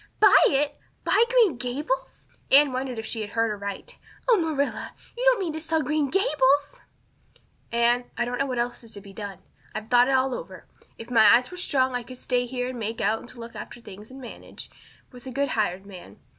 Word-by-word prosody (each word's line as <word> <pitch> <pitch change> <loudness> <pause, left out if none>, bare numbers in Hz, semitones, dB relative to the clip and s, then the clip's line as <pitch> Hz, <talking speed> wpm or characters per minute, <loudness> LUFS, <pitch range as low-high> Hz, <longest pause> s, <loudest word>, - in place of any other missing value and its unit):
"Buy 415 -2 +7
it! 290 +1 0 0.2
Buy 460 - +4
Green 460 - +4
Gables?" 290 - -3 0.2
Anne 280 -1 +6
wondered 255 -1 -3
if 225 - -5
she 225 0 -3
had 210 - -5
heard 225 +1 0
aright. 200 -1 -6 0.3
"Oh, - - +6
Marilla, 315 -6 -2 0.2
you 485 - -4
don't - - +5
mean 350 -5 -2
to 315 - -5
sell 320 -1 0
Green 295 +1 0
Gables!" 290 - +2 0.9
"Anne, 235 +1 +2
I 240 - +1
don't 245 +1 -4
know 275 - +1
what 255 -2 -3
else 240 0 -2
is 230 - -11
to - - -8
be 200 -1 -13
done. 200 -3 -8 0.3
I've 215 +1 -5
thought 245 0 +6
it 270 - +2
all 260 0 +2
over. - - -8 0.3
If 230 +2 -10
my 225 -3 +6
eyes 250 +5 0
were 360 - -8
strong 260 -7 +1
I 245 - -1
could 255 +1 -11
stay 245 -1 -1
here 250 0 -3
and 255 -2 -6
make 225 +1 -4
out 225 +2 0
to 240 - -14
look 230 0 -9
after - - -8
things 210 -2 -12
and 265 +1 -11
manage, 250 - -10 0.4
with 250 0 -13
a - - -5
good 280 +2 -1
hired 195 -4 -1
man. 180 - -12
250 Hz, 215 wpm, -25 LUFS, 230-290 Hz, 0.9 s, Buy